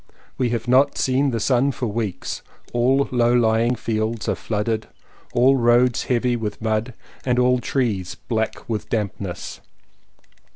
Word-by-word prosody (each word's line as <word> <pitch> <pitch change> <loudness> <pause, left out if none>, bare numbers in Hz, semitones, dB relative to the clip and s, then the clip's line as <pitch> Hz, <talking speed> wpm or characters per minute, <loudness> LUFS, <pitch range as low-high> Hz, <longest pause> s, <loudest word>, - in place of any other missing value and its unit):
We 125 -2 0
have 115 0 -2
not 130 +3 +4
seen 135 +2 +2
the 115 -3 -1
sun 130 +5 +2
for 125 - -3
weeks. 110 -3 -3 0.3
All 130 +3 +3
low 120 -1 +3
lying 115 0 +3
fields 110 -1 -2
are - - +2
flooded, 110 0 -2 0.4
all 130 +3 +4
roads 120 0 +3
heavy 125 0 +1
with 110 -3 -4
mud, 110 +2 -1 0.3
and 125 -1 +1
all 125 0 +3
trees 110 -9 -1
black 110 -2 -3
with 110 -2 -3
dampness. 100 -5 -4
120 Hz, 140 wpm, -22 LUFS, 110-125 Hz, 0.4 s, not